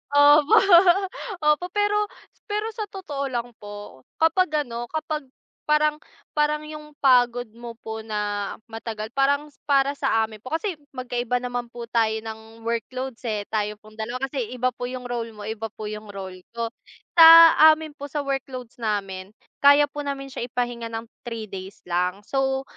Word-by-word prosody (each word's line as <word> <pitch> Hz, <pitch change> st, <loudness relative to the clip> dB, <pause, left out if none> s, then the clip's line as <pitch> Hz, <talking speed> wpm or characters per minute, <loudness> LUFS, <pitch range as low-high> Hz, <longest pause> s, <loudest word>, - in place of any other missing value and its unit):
Opo, 290 Hz, +1 st, +7 dB, 0.9 s
opo 300 Hz, +4 st, +3 dB
pero 415 Hz, 0 st, +2 dB, 0.5 s
pero 420 Hz, +1 st, -1 dB
sa 435 Hz, -2 st, -5 dB
totoo 290 Hz, -9 st, -5 dB
lang 245 Hz, -1 st, -3 dB
po, 205 Hz, -10 st, -10 dB
kapag 320 Hz, -2 st, +2 dB
ano 240 Hz, -1 st, -6 dB
kapag 305 Hz, -2 st, -4 dB, 0.4 s
parang 300 Hz, 0 st, +3 dB, 0.3 s
parang 300 Hz, 0 st, +1 dB
'yung 300 Hz, -1 st, -10 dB
pagod 245 Hz, -2 st, +4 dB
mo 235 Hz, 0 st, -9 dB
po 220 Hz, 0 st, -5 dB
na 210 Hz, -2 st, -3 dB, 0.2 s
matagal 220 Hz, -1 st, -6 dB
parang 285 Hz, +3 st, +1 dB, 0.2 s
para 275 Hz, -1 st, +4 dB
sa 225 Hz, -5 st, +2 dB
amin 220 Hz, -1 st, -6 dB
po 230 Hz, -, -13 dB
kasi 340 Hz, -2 st, -3 dB, 0.2 s
magkaiba 245 Hz, -1 st, -2 dB
naman 245 Hz, -1 st, -3 dB
po 240 Hz, 0 st, -9 dB
tayo 225 Hz, -2 st, +2 dB
ng 220 Hz, 0 st, -10 dB
workloads 245 Hz, +2 st, -3 dB
eh 210 Hz, -2 st, -1 dB
tayo 210 Hz, -1 st, -1 dB
pong 215 Hz, +1 st, -17 dB
dalawa. 245 Hz, +4 st, -4 dB
Kasi 260 Hz, -6 st, -2 dB
iba 255 Hz, +1 st, +1 dB
po 245 Hz, +1 st, -5 dB
yung 255 Hz, 0 st, -6 dB
role 235 Hz, -2 st, -4 dB
mo 210 Hz, -, -9 dB
iba 220 Hz, +1 st, -4 dB
po 215 Hz, -, -11 dB
yung 215 Hz, 0 st, -7 dB
role 190 Hz, -2 st, -8 dB, 0.2 s
ko. 230 Hz, 0 st, -2 dB, 0.5 s
Sa 325 Hz, -, +12 dB, 0.5 s
amin 310 Hz, -1 st, -8 dB
po 285 Hz, -1 st, -8 dB
sa 290 Hz, +1 st, -3 dB
workloads 260 Hz, -3 st, -5 dB
namin, 200 Hz, -2 st, -3 dB, 0.2 s
kaya 285 Hz, +1 st, +6 dB
po 295 Hz, -, -7 dB
namin 275 Hz, -1 st, -4 dB
siya 240 Hz, -, -4 dB
ipahinga 240 Hz, -1 st, -3 dB
ng 225 Hz, 0 st, -5 dB, 0.2 s
3 225 Hz, -3 st, -6 dB
days 190 Hz, +1 st, -8 dB
lang 180 Hz, +3 st, -1 dB
so 270 Hz, +2 st, 0 dB
245 Hz, 165 wpm, -24 LUFS, 220-285 Hz, 0.9 s, Sa